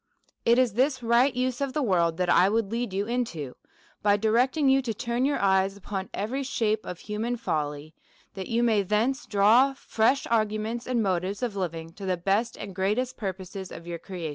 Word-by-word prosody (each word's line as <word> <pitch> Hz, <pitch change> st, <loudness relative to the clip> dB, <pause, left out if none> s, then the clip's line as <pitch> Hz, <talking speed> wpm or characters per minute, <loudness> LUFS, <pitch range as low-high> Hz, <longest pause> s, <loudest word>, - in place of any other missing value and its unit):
It 235 Hz, +1 st, +5 dB
is 255 Hz, -4 st, +3 dB
this 260 Hz, +2 st, +1 dB
right 235 Hz, +4 st, +4 dB
use 255 Hz, +1 st, -2 dB
of 275 Hz, -2 st, -1 dB
the 300 Hz, -, 0 dB
world 170 Hz, -7 st, +2 dB
that 180 Hz, -1 st, 0 dB
I 180 Hz, +2 st, +5 dB
would 220 Hz, -1 st, 0 dB
lead 235 Hz, -2 st, -2 dB
you 195 Hz, +2 st, -1 dB
into, 210 Hz, -, -3 dB, 0.5 s
by 205 Hz, 0 st, +3 dB
directing 250 Hz, +7 st, +2 dB
you 270 Hz, 0 st, +5 dB
to 230 Hz, -4 st, -3 dB
turn 235 Hz, +4 st, -1 dB
your 285 Hz, +1 st, +1 dB
eyes 195 Hz, 0 st, +2 dB
upon 195 Hz, -1 st, -5 dB
every 235 Hz, +7 st, -3 dB
shape 220 Hz, -5 st, -1 dB
of 180 Hz, -, -5 dB
human 220 Hz, +4 st, -3 dB
folly, 150 Hz, -6 st, -3 dB, 0.4 s
that 190 Hz, -2 st, -6 dB
you 235 Hz, +1 st, +1 dB
may 220 Hz, -3 st, +3 dB
thence 220 Hz, +8 st, 0 dB
draw 225 Hz, +7 st, +4 dB
fresh 260 Hz, +1 st, +1 dB
arguments 220 Hz, +1 st, 0 dB
and 245 Hz, -3 st, +1 dB
motives 190 Hz, +3 st, -1 dB
of 235 Hz, -5 st, -2 dB
living 165 Hz, -3 st, -4 dB
to 195 Hz, +2 st, -7 dB
the 185 Hz, -1 st, +1 dB
best 200 Hz, +6 st, 0 dB
and 200 Hz, -, -7 dB
great 195 Hz, +3 st, 0 dB
est 255 Hz, 0 st, -2 dB
purposes 190 Hz, -2 st, -6 dB
of 170 Hz, -, -9 dB
your 170 Hz, -1 st, -5 dB
creation. 175 Hz, -2 st, -6 dB
215 Hz, 200 wpm, -27 LUFS, 190-245 Hz, 0.5 s, It